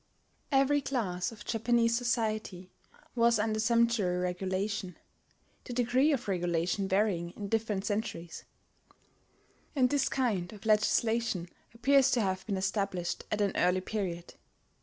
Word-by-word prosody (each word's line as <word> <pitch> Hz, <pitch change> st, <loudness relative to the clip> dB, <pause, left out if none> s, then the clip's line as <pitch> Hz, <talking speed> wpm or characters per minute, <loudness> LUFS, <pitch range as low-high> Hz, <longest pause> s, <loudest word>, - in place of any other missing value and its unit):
Every 275 Hz, +1 st, +3 dB
class 210 Hz, -10 st, -2 dB
of 210 Hz, -2 st, -12 dB
Japanese 230 Hz, 0 st, +2 dB
society 215 Hz, -6 st, -2 dB, 0.4 s
was 235 Hz, -1 st, +3 dB
under 215 Hz, 0 st, 0 dB
sumptuary 230 Hz, -5 st, +2 dB
regulation, 185 Hz, +1 st, -2 dB, 0.7 s
the 245 Hz, -, -7 dB
degree 250 Hz, +5 st, +2 dB
of 260 Hz, -6 st, -1 dB
regulation 175 Hz, +1 st, 0 dB
varying 190 Hz, -3 st, +1 dB
in 205 Hz, -1 st, -5 dB
different 215 Hz, -3 st, -1 dB
centuries; 205 Hz, -6 st, -4 dB, 1.3 s
and 255 Hz, -3 st, +3 dB
this 285 Hz, -2 st, +2 dB
kind 215 Hz, -9 st, -1 dB
of 210 Hz, +1 st, -13 dB
legislation 215 Hz, -3 st, +1 dB, 0.3 s
appears 270 Hz, +3 st, +4 dB
to 245 Hz, -, +2 dB
have 190 Hz, -2 st, -1 dB
been 200 Hz, -3 st, -1 dB
established 190 Hz, -2 st, -2 dB
at 210 Hz, -, 0 dB
an 200 Hz, -1 st, +2 dB
early 180 Hz, +1 st, +2 dB
period. 185 Hz, -4 st, -4 dB
215 Hz, 125 wpm, -30 LUFS, 185-235 Hz, 1.3 s, appears